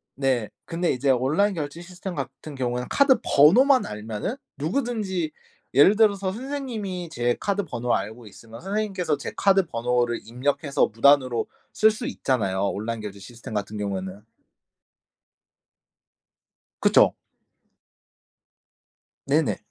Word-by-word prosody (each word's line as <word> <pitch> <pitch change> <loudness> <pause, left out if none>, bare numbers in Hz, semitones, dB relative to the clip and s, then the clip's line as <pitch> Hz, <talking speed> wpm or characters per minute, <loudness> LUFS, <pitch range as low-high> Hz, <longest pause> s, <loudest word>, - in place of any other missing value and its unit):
네. 130 -5 0 0.2
근데 170 +1 -1
이제 135 +2 0
온라인 150 +11 +2
결제 150 +1 -5
시스템 180 +1 -7
같은 140 +1 -7
경우에는 125 -1 -2
카드 275 -2 +5
번호만 250 - +5
알면은 105 - -4 0.2
누구든지 190 - -2 0.4
예를 145 +11 +6
들어서 200 -3 +2
선생님이 225 - -5
제 120 -4 0
카드 200 0 -1
번호 120 -6 -1
알고 110 +2 -5
있으면 115 +3 -13
선생님께서 195 -5 -1
제 - - -6
카드 195 -1 +3
번호를 120 -2 0
입력해서 140 +5 0
무단으로 130 0 +3 0.3
쓸 220 - +5
수 220 +2 -4
있잖아요. 100 - -1
온라인 110 +3 -4
결제 100 -1 -7
시스템 115 +3 -10
같은 105 +1 -3
경우에는. 100 0 -4 2.6
그쵸. - - +5 2.1
네네. - - +1
145 Hz, 285 characters per minute, -24 LUFS, 120-195 Hz, 2.6 s, 예를